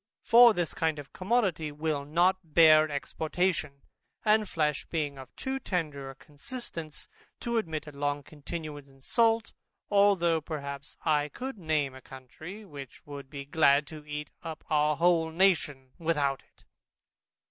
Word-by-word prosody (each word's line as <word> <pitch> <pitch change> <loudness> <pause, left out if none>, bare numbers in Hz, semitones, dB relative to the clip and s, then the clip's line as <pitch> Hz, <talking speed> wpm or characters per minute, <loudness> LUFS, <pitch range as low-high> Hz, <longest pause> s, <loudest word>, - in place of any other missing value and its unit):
For 235 -1 +7
this 175 -2 -1
kind 160 -1 0
of 145 -2 -10
commodity 185 -7 0
will 150 -1 -2
not 175 +2 +1
bear 155 -2 +7
exportation, 155 0 -2 0.4
and 215 -1 +3
flesh 150 -3 -1
being 145 -4 -2
of 130 - -10
too 265 0 -3
tender 150 - -3
a 135 - -10
consistence, 155 - -7 0.3
to 235 -1 -1
admit 160 -8 -2
a 150 - -9
long 145 0 -2
continuance 150 -1 -7
in 135 0 -21
salt, 225 - +2 0.4
although 190 -5 +4
perhaps 140 -3 -6
I 150 -2 +2
could 260 - -6
name 155 -5 0
a 130 - -11
country, 155 - -10
which 140 -7 -11
would 140 -2 -9
be 140 -1 -7
glad 145 -1 +4
to 155 -1 -9
eat 150 0 -6
up 160 -1 -7
our 150 -1 +3
whole 170 -2 +3
nation 160 -7 +1
without 145 -5 0
it. - - -29
155 Hz, 145 wpm, -29 LUFS, 145-180 Hz, 0.4 s, For